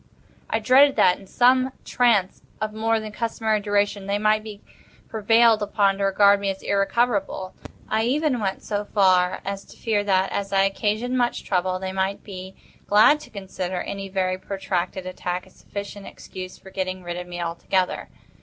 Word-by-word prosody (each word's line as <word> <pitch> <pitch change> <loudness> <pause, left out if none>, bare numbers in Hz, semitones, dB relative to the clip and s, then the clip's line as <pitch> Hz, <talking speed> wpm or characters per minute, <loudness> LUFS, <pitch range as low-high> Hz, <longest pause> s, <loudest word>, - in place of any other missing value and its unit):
I - - +1
dreaded 265 +6 +5
that, 180 - +4
in 195 - -15
some 255 +4 +3
trance 225 -7 +2 0.2
of 215 0 -3
more 225 +1 +1
than 215 -1 -7
customary 220 -1 -1
duration, 205 -1 0
they 200 +1 0
might 215 +1 +2
be 210 -2 -9 0.5
prevailed 225 0 +4
upon 200 -1 +1
to 200 - +1
regard 200 +1 +5
me 200 0 -1
as 195 0 -5
irrecoverable. 200 -2 0 0.3
I 220 +1 0
even 280 0 +1
went 195 -3 -3
so 205 -1 -2
far 185 -3 +2
as 195 0 -4
to - - -16
fear 210 -3 0
that, 190 -1 +2
as 200 -1 -3
I 195 0 +4
occasioned 215 +5 0
much 240 -1 0
trouble, 185 -1 0
they 190 0 -4
might 190 +1 -2
be 190 -1 -9 0.3
glad 215 +9 +6
to - - -13
consider 185 -3 -5
any 195 -1 -6
very 185 -1 -1
protracted 190 -1 -3
attack 180 0 -4
as - - -20
sufficient 200 0 -8
excuse 185 -1 -9
for 190 - -15
getting 185 -1 -3
rid 175 0 -5
of 180 0 -6
me 175 0 -7
altogether. 175 +2 -1
200 Hz, 175 wpm, -23 LUFS, 190-220 Hz, 0.5 s, glad